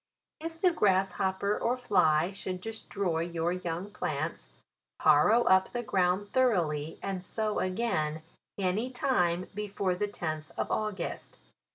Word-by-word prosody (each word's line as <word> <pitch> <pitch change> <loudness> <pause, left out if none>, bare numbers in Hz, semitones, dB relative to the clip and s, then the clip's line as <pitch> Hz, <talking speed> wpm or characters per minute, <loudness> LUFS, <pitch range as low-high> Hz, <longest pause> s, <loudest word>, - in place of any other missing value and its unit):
If 325 +1 -6
the 365 0 +4
grasshopper 195 - +1
or 245 +2 +1
fly 175 -8 +3
should 185 -2 -5
destroy 200 -4 -3
your 170 0 -1
young 180 +2 -4
plants, - - -3 0.5
harrow 235 +3 +5
up 190 0 +4
the 240 0 -2
ground 190 0 +1
thoroughly, 165 - +1
and 190 -2 -3
sow 215 +2 -1
again, 160 -6 -1 0.3
any 200 +5 0
time 185 -9 +1
before 200 -2 -1
the 205 +3 -1
tenth 155 -6 -4
of - - -2
August. 210 -5 -3
190 Hz, 130 wpm, -30 LUFS, 175-215 Hz, 0.5 s, harrow